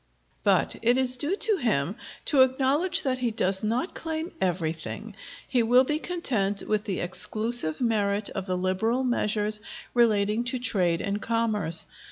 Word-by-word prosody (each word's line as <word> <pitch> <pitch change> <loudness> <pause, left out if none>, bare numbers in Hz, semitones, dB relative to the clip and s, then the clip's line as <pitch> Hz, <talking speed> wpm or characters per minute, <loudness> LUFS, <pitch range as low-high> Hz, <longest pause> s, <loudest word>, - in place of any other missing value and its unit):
But - - +2
it 240 +2 +3
is 255 -1 +2
due 295 +9 +1
to 425 -1 +3
him 200 - 0 0.3
to 280 -4 +4
acknowledge 270 +7 +2
that 260 -3 -1
he 245 -2 0
does 190 -3 -1
not 235 - -1
claim 320 +1 -5
everything; 180 +4 -3 0.3
he 250 -3 +2
will 245 +3 +5
be 300 +3 -1
content 230 - 0
with 215 0 0
the 195 -3 -2
exclusive 215 0 +1
merit 210 -3 0
of 195 -1 -5
the 185 -1 -1
liberal 190 +8 0
measures 210 -3 0 0.3
relating 215 -2 +2
to 255 +2 -1
trade 180 -9 0
and 200 +1 -3
commerce. 215 -8 0
225 Hz, 155 wpm, -26 LUFS, 200-255 Hz, 0.3 s, will